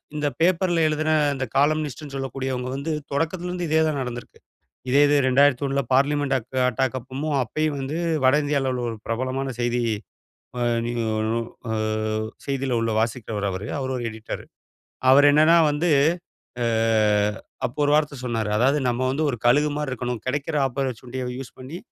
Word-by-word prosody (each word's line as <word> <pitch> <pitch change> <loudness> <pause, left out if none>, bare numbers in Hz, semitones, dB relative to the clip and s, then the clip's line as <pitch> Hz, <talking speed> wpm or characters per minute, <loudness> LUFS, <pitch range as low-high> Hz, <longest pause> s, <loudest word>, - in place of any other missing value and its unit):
இந்த 150 -1 0
பேப்பர்ல 175 -1 +3
எழுதின 155 +1 0 0.2
இந்த 135 0 -2
காலம்னிஸ்ட்னு 150 -1 0
சொல்லக்கூடியவங்க 130 -1 -3
வந்து, 145 +4 -3 0.2
தொடக்கத்தில 170 +5 -1
இருந்து 180 -2 -3
இதே 160 +1 +3
தான் 145 -3 -1
நடந்திருக்கு. 125 -1 -7 0.5
இதே 140 +3 +5
இது 145 - +3
2001 140 +1 +3
பார்லிமென்ட் 140 +1 +2
அக் 130 +2 -7
அட்டாக் 130 +2 -1
அப்பமும் 140 +4 -3
அப்பயும் 155 +5 -1
வந்து 140 +5 -3 0.3
வட 130 +3 +6
இந்தியாவுல 140 -2 0
உள்ள 125 - -3
ஒரு 115 - -5
பிரபலமான 130 +3 -2
செய்தி 120 0 0 0.8
அ - - 0 0.2
நிய 120 0 -3 0.3
நு 115 - 0 0.3
அ - - -1 0.7
செய்தி 135 -1 -2
உள்ள 115 - 0
வாசிக்கிறவரு 110 -3 -2
அவரு. 95 +2 -5
அவரு 130 -1 -3
ஒரு 120 - -4
எடிட்டரு. 110 0 -7 0.7
அவர் 145 +2 +7
என்னன்னா 155 +3 +6
வந்து 150 +4 0 0.8
அ - - +1 1.0
அப்போ 125 +5 -6
ஒரு 145 - +2
வார்த்த 150 -3 0
சொன்னாரு. 115 -3 -1
அதாவது 135 +5 +3
நம்ம 120 +1 -1
வந்து 155 +4 -1
ஒரு 120 - -4
கழுகுமார் 145 +3 +2
இருக்கணும். 125 -2 -3
கிடைக்கிற 140 +3 -2
ஆப்பர்சஷூனிட்டிய 130 -1 -4
யூஸ் 135 -2 -9
பண்ணி, 135 +6 -7
135 Hz, 155 wpm, -24 LUFS, 125-150 Hz, 1.0 s, அவர்